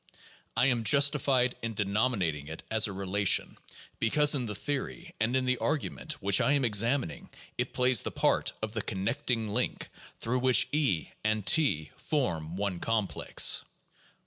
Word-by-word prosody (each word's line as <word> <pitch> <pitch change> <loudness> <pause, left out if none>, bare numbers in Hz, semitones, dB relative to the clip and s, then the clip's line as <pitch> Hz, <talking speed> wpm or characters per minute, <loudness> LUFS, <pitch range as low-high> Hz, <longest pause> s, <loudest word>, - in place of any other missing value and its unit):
I 125 - +4
am 120 -4 +1
justified 135 0 +3
in 115 -1 -4
de 105 - -1
nominating 100 - -1
it 80 +1 -8
as 110 -1 +4
a - - -6
relation, 100 +1 +1 0.4
because 145 +6 +3
in 130 -5 -1
the 105 - -5
theory 145 - -5
and 115 +3 0
in 130 -1 +1
the 130 0 0
argu 120 +5 -2
ment - - -4
which 100 0 +2
I 140 - +2
am 140 -3 +1
examining 115 - 0 0.3
it - - -3
plays 125 -3 +3
the - - -2
part - - 0
of 110 - -3
the 110 - -2
connecting 110 +4 -2
link 105 - -2 0.3
through 125 +3 -2
which 130 0 +4
E 120 - 0
and 110 -2 -1
T 135 - +2
form 85 - -3
one 100 -3 -3
complex. 105 -8 +2
115 Hz, 165 wpm, -29 LUFS, 100-130 Hz, 0.4 s, I